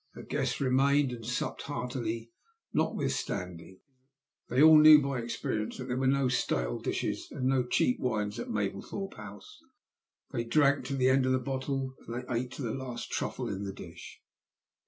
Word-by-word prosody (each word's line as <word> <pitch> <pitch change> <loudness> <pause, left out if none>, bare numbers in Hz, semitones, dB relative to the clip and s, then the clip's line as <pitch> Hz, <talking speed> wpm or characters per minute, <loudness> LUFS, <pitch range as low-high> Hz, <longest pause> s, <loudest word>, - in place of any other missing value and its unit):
Her - - -9
guests - - -2
remained 140 +1 +3
and 120 -2 -7
supped 120 +2 -3
heartily 120 -4 -4 0.4
notwithstanding. 90 -1 -2 0.7
They 125 - 0
all 155 +1 +9
knew 155 0 +10
by 140 -2 -2
experience 110 -2 -3
that 130 0 -7
there 125 - 0
were 135 - +1
no 135 0 +3
stale - - 0
dishes - - -2
and 130 - -4
no 130 -1 +3
cheap 125 - +2
wines 105 -4 -1
at - - -5
Mablethorpe 105 - -3
House. 420 0 -11 0.7
They 120 -4 -1
drank 140 +2 +3
to 135 +1 -2
the 130 -1 +3
end 130 0 +3
of 130 - +3
the - - +3
bottle, 130 +1 -3
and 115 - -5
they - - -3
ate 125 +2 -1
to 140 - -6
the 115 - -2
last 130 -3 -6
truffle - - -2
in 100 0 -4
the 100 -1 -4
dish. 85 -3 -11
130 Hz, 175 wpm, -30 LUFS, 115-135 Hz, 0.7 s, knew